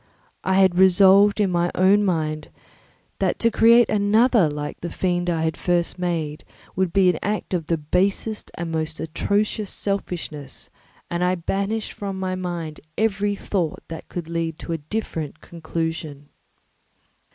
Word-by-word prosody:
I 190 - +1
had 190 -2 +4
resolved 195 +2 +6
in 200 -3 +2
my 175 0 +1
own 195 +3 +4
mind 155 -5 -1 0.7
that - - +1
to 230 - +2
create 230 +1 +6
another 210 -2 +3
like 145 0 -5
the 175 - -4
fiend 175 -1 -1
I 165 -2 0
had 160 -1 0
first 175 0 -1
made 165 -4 -2 0.3
would 185 -2 0
be 190 -1 +4
an 165 - -5
act 210 -1 -2
of 165 -4 -1
the 165 - +1
basest 190 +7 -1
and 170 -1 -4
most 160 0 -3
atrocious 200 +5 -1
selfishness, 170 -8 -4 0.4
and 170 +1 0
I 180 +1 +2
banished 200 +5 -2
from 195 -2 -5
my 185 -1 -2
mind 175 -4 -4 0.2
every 205 -2 +1
thought 180 -5 -2
that 165 -1 -8
could 175 -3 -5
lead 165 -1 -2
to 170 - -5
a 165 - -3
different 160 -2 -4
conclusion. 160 -3 -5
180 Hz, 150 wpm, -23 LUFS, 160-200 Hz, 0.7 s, resolved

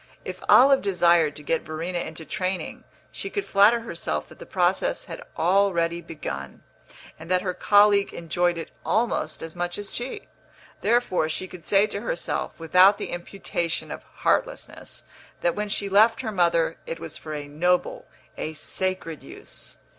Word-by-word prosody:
If - - -6
Olive 270 +1 +7
desired 170 -5 +3
to 150 - -10
get 165 +2 0
Verena 165 +3 -4
into 160 -1 -6
training, 185 +4 -3 0.3
she 390 - -6
could 405 0 -3
flatter 210 +4 +5
herself 170 - -4
that - - -15
the - - -10
process - - +1
had - - -8 0.2
already 170 -2 +2
begun, 70 - -7 0.6
and 160 +1 -10
that 185 0 +2
her 185 -2 -1
colleague 205 +1 +4
enjoyed 175 +1 0
it 165 - -6
almost 230 +2 0
as 165 0 -7
much 175 0 -3
as 205 -1 -5
she. 245 +2 -5 0.5
Therefore 215 -8 +2
she 185 +4 -3
could 180 -3 -11
say 200 +3 +4
to 205 -1 -4
herself, 195 -7 -3
without 180 +5 +6
the - - -5
imputation 175 -1 -3
of - - -6
heartlessness, - - -2 0.4
that 175 - +2
when 210 0 -3
she 200 0 -1
left 220 +4 +4
her 225 -4 -3
mother 170 -4 +2
it 165 - -4
was 165 -2 -7
for 155 -1 -7
a 145 -1 -6
noble, 175 +5 0 0.3
a 155 - -3
sacred 165 0 -4
use. - - -11
180 Hz, 160 wpm, -25 LUFS, 165-205 Hz, 0.6 s, Olive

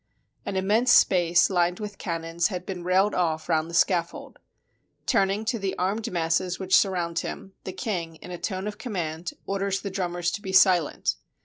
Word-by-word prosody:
An - - -3
immense 210 +6 +2
space 175 -2 +5
lined 175 -1 +1
with 210 -1 -7
cannons 165 -1 -1
had 180 -3 -5
been 180 -2 -5
railed 190 +3 +2
off 160 -3 -1
round 160 -1 +1
the 170 - -5
scaffold. 170 -1 0 0.7
Turning 195 +2 +1
to 230 0 -1
the 195 -1 -3
armed 200 +5 -1
masses 175 +1 0
which 190 -1 +2
surround 175 -4 +2
him, 195 - -6
the 185 - -4
king, 175 -8 -4
in 180 - -11
a 175 - -6
tone 190 -1 -3
of 210 0 -5
command, 170 -7 -4
orders 195 0 -1
the 200 - -5
drummers 175 -2 -2
to 205 - -5
be 190 -1 -5
silent. 185 -4 +3
185 Hz, 180 wpm, -26 LUFS, 170-195 Hz, 0.7 s, space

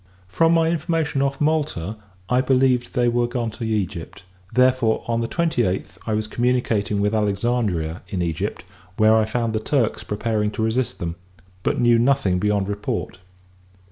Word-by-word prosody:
From 165 - +3
my 165 -1 +3
information 160 -4 0
off 140 0 0
Malta, 145 - 0 0.3
I 125 +3 +3
believed 130 -2 +2
they 120 -1 +3
were 120 0 +2
gone 120 -2 -2
to 115 - -8
Egypt: 95 -6 -3 0.3
therefore, 125 -3 +3
on 115 0 0
the 115 - -1
twenty 165 -5 0
eighth, 95 -2 -3
I 110 - +1
was 110 0 -1
communicating 115 -3 0
with 105 +1 +1
Alexandria 100 -6 0
in 95 - -3
Egypt; 80 -2 -3 0.3
where 110 +1 +5
I 110 -1 +3
found 115 0 -1
the 110 - 0
Turks 120 0 0
preparing 105 0 -1
to 110 - -2
resist 110 -2 0
them, 85 -1 -4 0.4
but - - 0
knew 120 -1 +4
nothing 120 -8 +2
beyond 105 -1 +1
report. 100 -2 -3
115 Hz, 165 wpm, -22 LUFS, 105-125 Hz, 0.4 s, where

